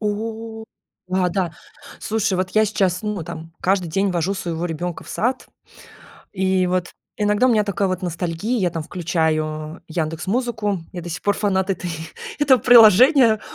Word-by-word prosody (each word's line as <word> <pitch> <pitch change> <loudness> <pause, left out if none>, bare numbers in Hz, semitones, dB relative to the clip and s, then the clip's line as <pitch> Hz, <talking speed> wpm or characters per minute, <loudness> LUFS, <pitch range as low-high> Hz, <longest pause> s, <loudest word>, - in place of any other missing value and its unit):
О, 220 +1 -4 0.4
да 185 -1 +1
да, 175 -2 -1 0.5
слушай, 220 -2 0
вот 185 0 -1
я 215 0 +3
сейчас, 195 -3 0
ну 210 -4 -3
там 165 0 -8
каждый 185 -2 +1
день 195 +4 0
вожу 180 +2 -1
своего 170 -2 -4
ребенка 175 +1 -4
в - - -14
сад. 255 +3 -1 0.9
И 190 -1 +1
вот 180 -1 -1 0.3
иногда 210 +4 +2
у - - +3
меня 215 -2 +3
такая 200 -1 -1
вот 185 0 -2
ностальгия, 180 +6 -2
я 180 - +1
там 165 -2 -5
включаю 155 -2 -2
"Яндекс 160 +1 -3
музыку". 220 -4 -1
Я 175 - -5
до 175 - -7
сих 180 +4 -5
пор 205 0 +1
фанат 190 -2 0
этой 180 -2 -2 0.5
этого 265 -4 +5
приложения, 235 - +7
190 Hz, 165 wpm, -21 LUFS, 175-215 Hz, 0.9 s, приложения